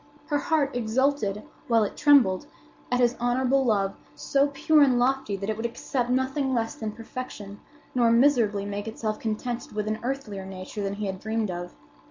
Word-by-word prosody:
Her 295 -1 0
heart 285 -3 0
exulted, 235 -3 0 0.2
while 230 -3 +4
it 205 - -3
trembled, 275 -6 +4 0.4
at 250 - +2
his 245 -1 +3
honorable 255 +3 +2
love—so 200 - 0
pure 295 +2 +3
and 260 -3 +5
lofty 245 -4 +1
that 195 +1 -5
it 215 - -1
would 225 +2 -4
accept 240 +1 -3
nothing 260 +1 0
less 225 -1 -1
than 220 -1 -5
perfection 220 -4 -8 0.3
nor 240 -2 +3
miserably 230 -5 +3
make 205 +1 -4
itself 220 -1 -3
contented 240 +4 -4
with 210 0 -2
an 215 +1 -1
earthlier 240 -6 -4
nature 190 +2 -7
than 200 0 -2
he 210 0 -4
had 190 -1 -4
dreamed 220 -1 -1
of. 175 0 -6
230 Hz, 175 wpm, -26 LUFS, 205-265 Hz, 0.4 s, and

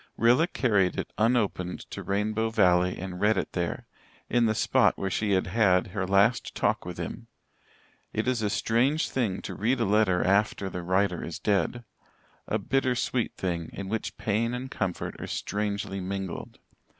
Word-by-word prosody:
Rilla 125 +8 +4
carried 105 - +1
it - - -4
unopened 105 -6 +1
to - - -5
Rainbow 110 +3 0
Valley 90 -4 +3
and 90 0 -6
read 105 0 +3
it - - -2
there, - - -2 0.5
in 120 -2 +4
the 110 - +1
spot - - +3
where 95 -1 -2
she 105 0 0
had 95 - +2
had 100 -4 +2
her 95 -3 -1
last 100 +5 +2
talk - - 0
with - - -6
him. - - -6 0.8
It 110 +3 -2
is 125 -3 +1
a 105 - +1
strange 125 +9 +1
thing 110 -8 -1
to - - -5
read 120 +6 0
a - - +2
letter 100 -3 +3
after 100 0 +1
the 90 - -4
writer 95 +1 +1
is 85 - -5
dead 105 +4 0 0.6
a 110 - +1
bitter 130 +4 0
sweet 120 0 -1
thing, 85 -3 -3
in 95 -1 -6
which 110 +1 -3
pain 115 +3 0
and 130 +2 -6
comfort 90 -8 -3
are - - -5
strangely 100 -1 -3
mingled. 95 -1 -5
105 Hz, 175 wpm, -27 LUFS, 95-115 Hz, 0.8 s, Rilla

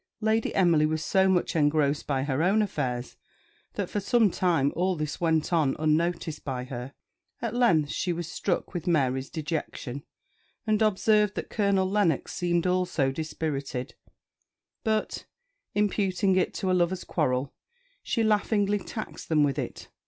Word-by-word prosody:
Lady 220 0 0
Emily 170 -5 +4
was 155 0 -2
so 190 0 +3
much 180 -2 +1
engrossed 145 -1 +2
by 135 -2 0
her 140 +1 -1
own 200 +5 +3
affairs 125 -10 -3 0.6
that - - -2
for 205 - -2
some 215 0 +3
time 165 -7 +1
all 185 +1 +1
this 155 0 -4
went 160 0 +1
on 150 -5 +2
unnoticed 155 0 0
by 130 -2 -3
her. 125 0 -7 0.4
At 230 -2 -3
length 170 - +3
she 180 - -1
was 170 -1 -3
struck 180 +2 -2
with 175 -2 -5
Mary's 135 -5 +1
dejection, 150 -4 -4 0.6
and 215 -1 +1
observed 210 0 +3
that - - -5
Colonel 200 -3 +2
Lennox 190 -7 +1
seemed 175 -1 0
also 180 -7 +1
dispirited; 140 -3 -4 0.9
but, 220 -2 -1 0.5
imputing 195 -2 +1
it 185 - +1
to 190 - -1
a - - +3
lover's 180 0 +1
quarrel, 135 -4 -1 0.5
she 230 - 0
laughingly 210 -1 +2
taxed 215 +3 -7
them 155 -2 +4
with 140 0 0
it. 125 - -6
170 Hz, 150 wpm, -27 LUFS, 145-195 Hz, 0.9 s, Emily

